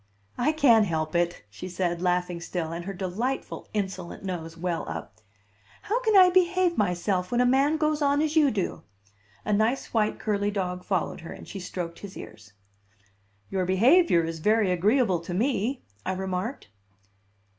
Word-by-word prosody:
"I 250 +5 +3
can't 235 -9 +5
help 155 -2 -2
it," 175 -6 0
she 110 - -8
said, 175 -1 -2
laughing 180 -1 0
still, 165 -1 -3
and 170 +1 -5
her 195 - -4
delightful, 200 +9 -3
insolent 190 -4 -4
nose 165 -3 -5
well 175 -1 -2
up; 85 +6 -7 0.6
"how 450 +5 0
can 440 -5 +3
I 365 -1 +8
behave 360 -1 +3
myself 180 - 0
when 240 - +1
a 250 - +4
man 275 +5 +3
goes 305 0 0
on 285 0 +3
as 310 +1 0
you 300 -3 +5
do?" 200 -7 -2 0.6
A 210 - 0
nice 220 +6 0
white 215 -2 +1
curly 205 -1 0
dog 180 -3 -3
followed 185 -3 -2
her, 165 - -9
and - - -12
she 195 - -7
stroked 175 -2 -5
his 200 -2 -9
ears. 105 -1 -11 1.0
"Your 190 -1 0
behavior 200 - +4
is 165 0 -4
very 210 +2 +2
agreeable 195 +1 +2
to 170 +1 -6
me," 245 +3 0 0.2
I 190 - -1
remarked. 190 - -4
190 Hz, 165 wpm, -26 LUFS, 175-255 Hz, 1.0 s, I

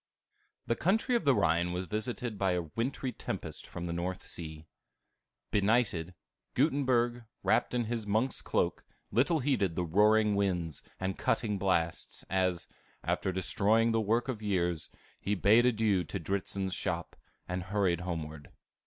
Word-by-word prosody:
The 115 - +1
country 220 - +1
of 235 - 0
the 140 -2 +5
Rhine 85 -2 +2
was 90 +1 -2
visited 110 +3 -3
by 95 -2 +2
a 90 -1 0
wintry 130 +2 -1
tempest - - -5
from 85 - -6
the 85 - -2
North 90 +2 -3
Sea. 80 -2 -7 0.9
Benighted, 100 -5 +2 0.4
Gutenberg, 125 -4 +2 0.2
wrapped - - +2
in 120 -1 +1
his 115 -2 -3
monk's 110 +6 +1
cloak, - - 0 0.3
little 140 - +3
heeded 120 - +1
the 90 - 0
roaring 105 +4 +4
winds 90 -6 -1 0.2
and 95 0 -2
cutting 105 -4 0
blasts, 85 -4 -1
as, 90 -3 +1 0.4
after 95 - 0
destroying 105 +5 +2
the 115 0 +2
work 115 +4 +1
of 120 -5 -3
years, 90 -5 0 0.3
he 105 - 0
bade 110 +6 +5
adieu 110 -6 +2
to 100 - -4
Dritzhn's 95 +2 -2
shop, - - -3 0.3
and 90 +1 -2
hurried 95 -2 +1
homeward. 80 -4 -5
100 Hz, 145 wpm, -31 LUFS, 90-115 Hz, 0.9 s, the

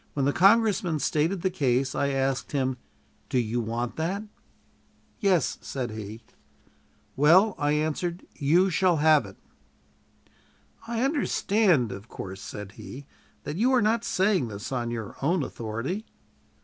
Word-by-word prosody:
When 140 -2 0
the 140 - +2
congressman 195 -4 +4
stated 160 +5 0
the 190 - +1
case, 130 -6 +1
I 140 - 0
asked 135 0 -1
him, 130 -2 0 0.5
"Do - - 0
you 120 0 0
want 115 +2 -3
that?" 185 +6 -2 1.0
"Yes," 190 - +1
said 125 -4 -4
he. 110 +1 -8 0.9
"Well," 180 +9 +5
I 145 0 +1
answered, 155 +4 -2
"you 170 +6 +3
shall 175 -1 +3
have 150 -6 +4
it." 95 - -13 1.5
"I 235 +1 -1
understand, 210 - +2
of 100 +3 -8
course," 95 +1 -7
said 105 -2 -7
he, 135 +6 -10 0.4
"that 150 +2 -5
you 245 +6 +3
are 255 - +5
not 225 +2 +2
saying 190 - +1
this 105 +1 -7
on 120 -2 -2
your 115 -3 -5
own 160 +3 +1
authority?" 125 - -4
150 Hz, 140 wpm, -26 LUFS, 120-185 Hz, 1.5 s, Well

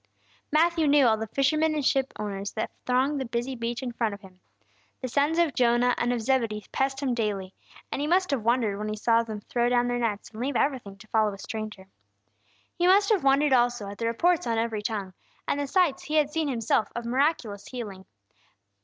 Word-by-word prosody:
Matthew 325 +1 +3
knew 285 -1 +5
all 220 -2 +4
the 220 +1 -4
fishermen 310 +5 +1
and 295 -3 -1
ship 270 0 +2
owners 200 -1 -4
that 220 - -3 0.2
thronged 265 +3 +1
the - - -2
busy 240 +2 -3
beach 235 +1 -4
in 250 - -3
front 230 -3 -1
of 200 - -16
him. 185 -2 -16 0.6
The 255 - -4
sons 285 +6 +1
of 335 -5 +2
Jonah 245 0 +3
and 240 - +1
of 245 -2 -1
Zebedee 225 -4 0
passed 270 0 -1
him 260 -3 +1
daily; 205 -5 -2 0.4
and - - -2
he 295 - -1
must 365 +2 +2
have 275 -4 0
wondered 225 -3 +1
when 215 0 -3
he 215 - -2
saw 230 +2 +3
them 220 -2 -6
throw 240 +3 0
down 245 0 +2
their 245 0 -1
nets 215 -4 -2
and 220 +1 -8
leave 270 +1 -2
everything 240 -9 -1
to 215 +2 -15
follow 215 -2 +2
a - - -9
stranger. 215 -1 -6 0.9
He 350 0 +1
must 400 +2 +5
have 405 -8 +2
wondered 275 +1 +4
also 240 -4 +2
at 200 - -9
the 230 - -1
reports 335 +6 +1
on 230 -1 0
every 225 -2 -1
tongue, 205 -3 -4 0.3
and 285 - 0
the 285 - -2
sights 335 -3 +2
he 305 - -3
had 300 -1 +3
seen 315 0 -1
himself 230 -4 +1
of 235 0 -4
miraculous 240 -6 0
healing. 205 -7 -7
240 Hz, 215 wpm, -27 LUFS, 215-280 Hz, 0.9 s, knew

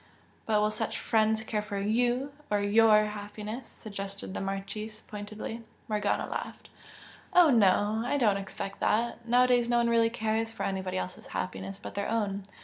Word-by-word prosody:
"But 215 -1 +3
will 210 0 +2
such 220 0 -2
'friends' 220 0 +2
care 215 -1 -1
for 205 -1 -5
YOU 245 +7 +1 0.2
or 205 - +2
YOUR 215 +1 +5
happiness?" 210 +3 -6
suggested 200 -2 -7
the - - -3
Marchese, 205 +3 -5
pointedly. 215 +2 -6 0.3
Morgana 210 -2 0
laughed. - - -6 0.6
"Oh, 350 -4 +7
no, 210 -1 +4
I 245 +4 0
do 255 - +2
not 205 -2 +4
expect 195 0 -6
that! 235 +2 0
Nowadays 245 0 +4
no 240 - +3
one 235 0 +3
really 230 -1 +4
cares 225 -1 -1
for - - -5
anybody 190 -1 -2
else's 90 0 -5
happiness 95 +1 -4
but - - -8
their 200 0 -2
own. 205 -3 -1
215 Hz, 165 wpm, -29 LUFS, 200-230 Hz, 0.6 s, Oh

